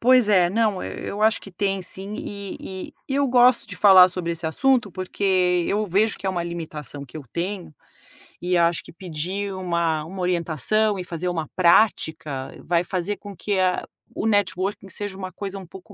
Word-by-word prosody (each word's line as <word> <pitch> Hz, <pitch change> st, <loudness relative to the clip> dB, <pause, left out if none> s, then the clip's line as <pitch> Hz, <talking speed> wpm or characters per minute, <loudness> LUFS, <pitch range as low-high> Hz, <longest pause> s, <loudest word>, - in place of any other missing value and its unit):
Pois 250 Hz, -2 st, +5 dB
é, 180 Hz, -4 st, +4 dB
não, 215 Hz, -2 st, +1 dB
eu 205 Hz, +1 st, -5 dB
acho 220 Hz, 0 st, +4 dB
que 195 Hz, -, -11 dB
tem 195 Hz, +1 st, -1 dB
sim 195 Hz, +3 st, -8 dB
e 200 Hz, -1 st, -6 dB
e 190 Hz, -1 st, -7 dB
e 270 Hz, -, -1 dB
eu 280 Hz, 0 st, +3 dB
gosto 245 Hz, -1 st, +5 dB
de 190 Hz, -, -7 dB
falar 190 Hz, -2 st, +8 dB
sobre 180 Hz, -2 st, -3 dB
esse 165 Hz, 0 st, -5 dB
assunto, 240 Hz, +5 st, +2 dB
porque 185 Hz, -1 st, +1 dB
eu 210 Hz, +1 st, +1 dB
vejo 205 Hz, +4 st, +1 dB
que -, -, -6 dB
é -, -, +2 dB
uma 175 Hz, -2 st, -2 dB
limitação 155 Hz, -4 st, -6 dB
que 140 Hz, +3 st, -12 dB
eu 155 Hz, -, -6 dB
tenho 180 Hz, -1 st, -4 dB, 0.7 s
e 180 Hz, 0 st, +1 dB
acho 170 Hz, 0 st, +2 dB
que -, -, -13 dB
pedir 185 Hz, +3 st, -4 dB
uma 170 Hz, -4 st, -1 dB
uma 185 Hz, +3 st, -7 dB
orientação 180 Hz, +4 st, +1 dB
e 180 Hz, -, -3 dB
fazer 175 Hz, +1 st, -3 dB
uma 165 Hz, -3 st, -2 dB
prática 160 Hz, -7 st, +2 dB
vai 170 Hz, 0 st, +2 dB
fazer 185 Hz, +3 st, -2 dB
com 205 Hz, -1 st, -10 dB
que 205 Hz, +2 st, -2 dB, 0.6 s
o -, -, -1 dB
networking 200 Hz, -1 st, 0 dB
seja 195 Hz, +1 st, -5 dB
uma 185 Hz, -1 st, -6 dB
coisa 195 Hz, +1 st, -6 dB
um 190 Hz, -, -10 dB
pouco 190 Hz, +4 st, -13 dB
185 Hz, 190 wpm, -23 LUFS, 170-205 Hz, 0.7 s, falar